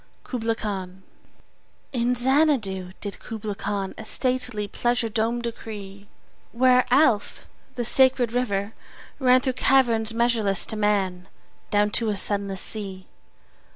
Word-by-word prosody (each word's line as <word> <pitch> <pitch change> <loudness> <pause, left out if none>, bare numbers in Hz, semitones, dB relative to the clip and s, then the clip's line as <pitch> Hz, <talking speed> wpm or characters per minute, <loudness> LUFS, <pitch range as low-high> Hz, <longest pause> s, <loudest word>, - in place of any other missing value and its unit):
Kubla 230 -3 -2
Khan 190 -4 -5 0.9
IN 245 0 +1
Xanadu 245 -8 +2
did 205 -1 -5
Kubla 215 -2 -5
Khan 200 -1 -3
A - - -6
stately 250 -2 -1
pleasure 240 +1 0
dome 230 +2 -1
decree: 205 -4 -7 0.5
Where 250 +1 +4
Alph, 250 -5 +2 0.3
the 240 - -2
sacred 255 -1 +3
river, 205 -4 -1 0.5
ran 255 -1 +5
Through 260 0 -1
caverns 240 -4 +2
measureless 225 -4 +1
to 220 - -2
man 195 -4 0 0.4
Down 210 0 +2
to 220 +3 +1
a 205 - -1
sunless 200 -1 -1
sea. 195 -3 -3
220 Hz, 120 wpm, -24 LUFS, 200-245 Hz, 0.9 s, ran